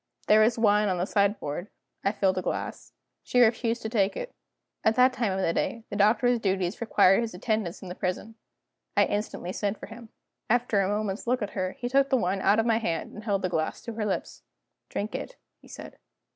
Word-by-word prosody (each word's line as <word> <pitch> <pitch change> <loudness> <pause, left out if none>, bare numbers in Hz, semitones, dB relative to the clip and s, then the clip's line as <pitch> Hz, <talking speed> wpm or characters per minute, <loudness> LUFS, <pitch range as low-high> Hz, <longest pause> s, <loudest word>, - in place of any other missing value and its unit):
There 215 - +6
was 225 +2 +3
wine 210 -2 +3
on 185 - 0
the 175 - 0
sideboard; 200 -4 -1 0.3
I 195 - +2
filled 190 -3 +1
a - - -2
glass. - - -4 0.3
She 250 - 0
refused 235 0 +2
to - - -2
take 205 -4 +1
it. - - -6 0.5
At 220 - +3
that 255 +1 +5
time 230 -5 0
in 190 - -2
the 165 - +1
day, 230 +5 -2
the - - -3
Doctor's 235 +4 +3
duties 190 -1 -1
required 200 -3 +4
his 225 -5 -4
attendance 205 -2 -2
in - - -8
the 180 - -5
prison. 185 +4 -3 0.6
I - - +6
instantly 205 -3 -3
sent 205 +1 -2
for - - -7
him. 225 +1 -12 0.4
After 235 -3 +2
a 190 - +1
moment's 210 +1 -2
look 250 -2 +1
at 205 - -4
her, 185 -1 -2
he 245 - -5
took 275 +2 +3
the 265 - +3
wine 190 -2 -1
out 205 +2 +4
of 225 - +2
my 225 -1 +3
hand, 170 -8 -3
and 210 - -9
held 200 -3 0
the 185 - +1
glass 160 -2 -2
to 230 - -7
her 215 -1 -3
lips. 195 - -3 0.5
"Drink 210 +2 -4
it," - - -5 0.3
he - - -17
said. - - -11
210 Hz, 220 wpm, -27 LUFS, 190-230 Hz, 0.6 s, There